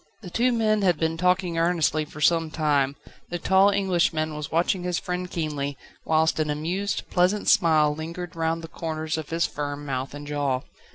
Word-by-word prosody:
The 180 Hz, -, -8 dB
two 245 Hz, +5 st, +2 dB
men 215 Hz, -3 st, +2 dB
had 180 Hz, -4 st, +3 dB
been 160 Hz, +1 st, 0 dB
talking 180 Hz, 0 st, +1 dB
earnestly 165 Hz, -2 st, +1 dB
for 150 Hz, 0 st, -11 dB
some 165 Hz, +1 st, +3 dB
time, 145 Hz, -3 st, +1 dB, 0.3 s
the 175 Hz, -, -2 dB
tall 190 Hz, +3 st, +4 dB
Englishman 175 Hz, -6 st, +1 dB
was 150 Hz, -2 st, -6 dB
watching 175 Hz, +3 st, +1 dB
his 180 Hz, -1 st, -1 dB
friend 180 Hz, 0 st, -3 dB
keenly, 145 Hz, -5 st, -3 dB, 0.3 s
whilst 160 Hz, 0 st, +2 dB
an 155 Hz, -1 st, 0 dB
amused, 175 Hz, +7 st, -2 dB
pleasant 185 Hz, +3 st, +2 dB
smile 160 Hz, -7 st, +4 dB
lingered 165 Hz, +3 st, -6 dB
round 165 Hz, 0 st, -1 dB
the -, -, -6 dB
corners 160 Hz, -1 st, -3 dB
of 155 Hz, -, -7 dB
his 165 Hz, +1 st, +1 dB
firm 145 Hz, 0 st, -4 dB
mouth 135 Hz, 0 st, -3 dB
and 145 Hz, 0 st, -8 dB
jaw. 145 Hz, -3 st, -1 dB
165 Hz, 180 wpm, -25 LUFS, 150-180 Hz, 0.3 s, tall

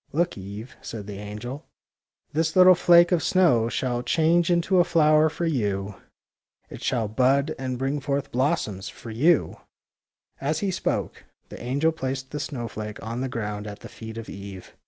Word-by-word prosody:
'' -, -, -38 dB
Look, 170 Hz, +4 st, 0 dB
Eve," 100 Hz, +5 st, -8 dB
said 110 Hz, -3 st, -7 dB
the 100 Hz, -1 st, -7 dB
angel. 105 Hz, +7 st, -7 dB, 0.3 s
" -, -, -49 dB
This 160 Hz, +1 st, 0 dB
little 185 Hz, 0 st, +8 dB
flake 175 Hz, 0 st, +5 dB
of 175 Hz, -3 st, +3 dB
snow 125 Hz, -12 st, +3 dB
shall 120 Hz, 0 st, -1 dB
change 165 Hz, +5 st, +2 dB
into 175 Hz, +2 st, +3 dB
a -, -, +7 dB
flower 155 Hz, -2 st, +4 dB
for 170 Hz, +2 st, -3 dB
you. 105 Hz, -9 st, -1 dB, 0.8 s
It -, -, -9 dB
shall 115 Hz, -4 st, 0 dB
bud 135 Hz, +7 st, +2 dB
and 130 Hz, -1 st, -3 dB
bring 135 Hz, +3 st, -1 dB
forth 140 Hz, 0 st, -2 dB
blossoms 125 Hz, -, -1 dB
for 115 Hz, -, -10 dB
you! 150 Hz, +8 st, +2 dB, 0.4 s
" -, -, -39 dB
As 150 Hz, +3 st, 0 dB
he 200 Hz, -2 st, 0 dB
spoke, -, -, -3 dB, 0.2 s
the -, -, -9 dB
angel 140 Hz, +6 st, +1 dB
placed 130 Hz, -3 st, -4 dB
the 150 Hz, -, -4 dB
snow 130 Hz, -5 st, -4 dB
flake 105 Hz, -1 st, -6 dB
on 115 Hz, +2 st, -4 dB
the 130 Hz, -, -2 dB
ground 105 Hz, -3 st, -4 dB
at 105 Hz, 0 st, -8 dB
the -, -, -10 dB
feet 110 Hz, 0 st, -9 dB
of 115 Hz, -, -7 dB
Eve. 100 Hz, -1 st, -9 dB
130 Hz, 185 wpm, -25 LUFS, 110-160 Hz, 0.8 s, little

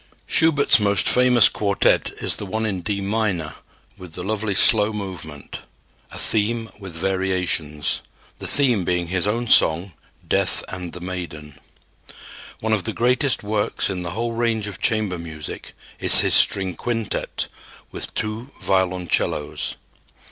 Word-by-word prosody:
Schubert's 155 Hz, -6 st, +4 dB
most 100 Hz, -2 st, +1 dB
famous 125 Hz, -3 st, +5 dB
quartet 100 Hz, -2 st, +1 dB
is -, -, 0 dB
the -, -, -6 dB
one 110 Hz, +4 st, -2 dB
in 95 Hz, -4 st, -3 dB
D 100 Hz, +2 st, -3 dB
minor 100 Hz, -6 st, -2 dB, 0.5 s
with 90 Hz, -3 st, -11 dB
the 90 Hz, -, -5 dB
lovely 105 Hz, 0 st, -2 dB
slow 105 Hz, +1 st, +5 dB
movement, 90 Hz, -8 st, -8 dB, 0.5 s
a -, -, -9 dB
theme 115 Hz, +1 st, 0 dB
with 95 Hz, -5 st, -10 dB
variations, 90 Hz, -5 st, -1 dB, 0.4 s
the -, -, -6 dB
theme 125 Hz, -9 st, +2 dB
being 90 Hz, -1 st, -2 dB
his 95 Hz, +1 st, 0 dB
own 120 Hz, +3 st, -1 dB
song, 85 Hz, -2 st, +3 dB, 0.3 s
"Death -, -, 0 dB
and 90 Hz, -2 st, -7 dB
the 90 Hz, -, -8 dB
Maiden." 85 Hz, -5 st, -7 dB, 1.0 s
One 110 Hz, 0 st, 0 dB
of 105 Hz, -4 st, -1 dB
the 110 Hz, -, -2 dB
greatest 125 Hz, +3 st, +1 dB
works 105 Hz, -1 st, -1 dB
in 90 Hz, -2 st, -4 dB
the 90 Hz, -, -5 dB
whole 115 Hz, 0 st, -2 dB
range 115 Hz, -2 st, -1 dB
of 100 Hz, -, -8 dB
chamber 105 Hz, -5 st, 0 dB
music 80 Hz, -3 st, -8 dB, 0.3 s
is -, -, +9 dB
his -, -, +1 dB
string 95 Hz, -2 st, +5 dB
quintet 115 Hz, -3 st, -3 dB, 0.4 s
with -, -, -3 dB
two 110 Hz, +4 st, -4 dB
violoncellos. 90 Hz, -5 st, -1 dB
100 Hz, 140 wpm, -21 LUFS, 90-110 Hz, 1.0 s, is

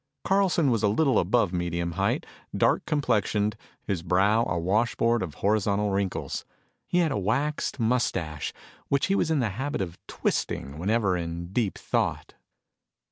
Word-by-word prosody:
Carlson 190 Hz, -7 st, +3 dB
was 115 Hz, -, +1 dB
a 105 Hz, -, +3 dB
little 130 Hz, +4 st, +3 dB
above 100 Hz, 0 st, +2 dB
medium 85 Hz, -1 st, -1 dB
height, -, -, 0 dB, 0.3 s
dark -, -, +3 dB
complexioned, 105 Hz, -7 st, +1 dB, 0.3 s
his 95 Hz, -4 st, -2 dB
brow 100 Hz, +6 st, +3 dB
a -, -, 0 dB
washboard 115 Hz, +6 st, +1 dB
of 80 Hz, -6 st, -4 dB
horizontal 105 Hz, 0 st, +1 dB
wrinkles. 95 Hz, -1 st, -2 dB, 0.4 s
He 175 Hz, -, 0 dB
had 170 Hz, -4 st, +3 dB
a 105 Hz, -, 0 dB
waxed 135 Hz, +9 st, -1 dB
mustache 95 Hz, -, 0 dB, 0.4 s
which 140 Hz, 0 st, +2 dB
he 195 Hz, -, +1 dB
was 170 Hz, -, +1 dB
in 155 Hz, -4 st, +2 dB
the 115 Hz, -, +1 dB
habit 130 Hz, +9 st, -3 dB
of 90 Hz, -3 st, -4 dB
twisting 70 Hz, +2 st, -2 dB
whenever 100 Hz, +1 st, +1 dB
in 85 Hz, +1 st, -5 dB
deep 110 Hz, -5 st, 0 dB
thought. -, -, -1 dB
105 Hz, 150 wpm, -27 LUFS, 90-125 Hz, 0.4 s, Carlson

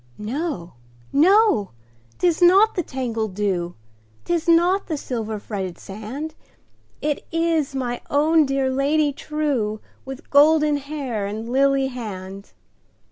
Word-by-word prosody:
No! 220 Hz, -, -4 dB, 0.4 s
no! 335 Hz, -, +4 dB, 0.4 s
'tis 350 Hz, -1 st, +1 dB
not 390 Hz, +5 st, +6 dB
the 355 Hz, -, -1 dB
tangled 230 Hz, -, -3 dB
dew,'Tis 175 Hz, -, -4 dB
not 350 Hz, +4 st, +3 dB
the 315 Hz, -, -2 dB
silver 225 Hz, -5 st, -4 dB
fretted 195 Hz, -4 st, -5 dB
sand, 230 Hz, +11 st, -7 dB, 0.7 s
It 295 Hz, -1 st, -1 dB
is 330 Hz, -4 st, 0 dB
my 245 Hz, -2 st, -3 dB
own 305 Hz, +1 st, +3 dB
dear 270 Hz, -1 st, 0 dB
Lady 285 Hz, +2 st, +1 dB
trueWith 270 Hz, -3 st, -4 dB
golden 300 Hz, +1 st, +5 dB
hair 270 Hz, -8 st, -4 dB
and 215 Hz, +3 st, -5 dB
lily 270 Hz, +2 st, +2 dB
hand! 200 Hz, -5 st, -8 dB
270 Hz, 110 wpm, -22 LUFS, 210-310 Hz, 0.7 s, not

